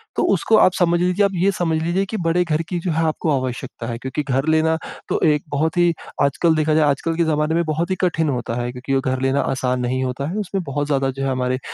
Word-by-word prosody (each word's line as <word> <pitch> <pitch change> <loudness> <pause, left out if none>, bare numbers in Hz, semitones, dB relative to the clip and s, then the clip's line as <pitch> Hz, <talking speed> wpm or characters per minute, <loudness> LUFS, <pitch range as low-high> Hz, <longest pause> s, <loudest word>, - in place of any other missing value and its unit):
तो - - +1
उसको 220 - +3
आप 185 - +5
समझ 175 -1 +3
लीजिए 180 +3 +2
आप 200 - 0
ये 185 +3 +2
समझ 165 -4 -1
लीजिए 180 +4 0
कि 220 - -3
बड़े 175 +2 +3
घर 160 -1 0
की 175 -2 -2
जो 175 0 -2
है 160 +1 +1
आपको 155 0 -1
आवश्यकता 120 -2 -5
है 115 -1 -3
क्योंकि 130 +3 -3
घर 135 +2 -1
लेना 160 0 +3 0.3
तो - - 0
एक 150 -1 0
बहुत 160 +5 -1
ही 175 -1 +4 0.3
आजकल 160 +4 +2
देखा 155 0 +1
जाए, 155 0 +4
आजकल 160 +4 -1
के 170 - +3
ज़माने 155 0 +1
में 170 - +2
बहुत 160 +2 -1
ही - - +2
कठिन 160 -3 0
होता 120 -3 -2
है 120 0 -3
क्योंकि 125 +2 -4
वो 135 - +2
घर 130 0 -2
लेना 135 +1 +2
आसान 130 -1 -1
नहीं 130 +2 -1
होता 130 +2 -3
है, 190 - -4
उसमें 195 -2 -2
बहुत 145 -1 -3
ज़्यादा 135 -2 +1
जो 135 +1 -5
है 135 - 0
हमारे 130 0 -1
155 Hz, 260 wpm, -21 LUFS, 135-170 Hz, 0.3 s, आप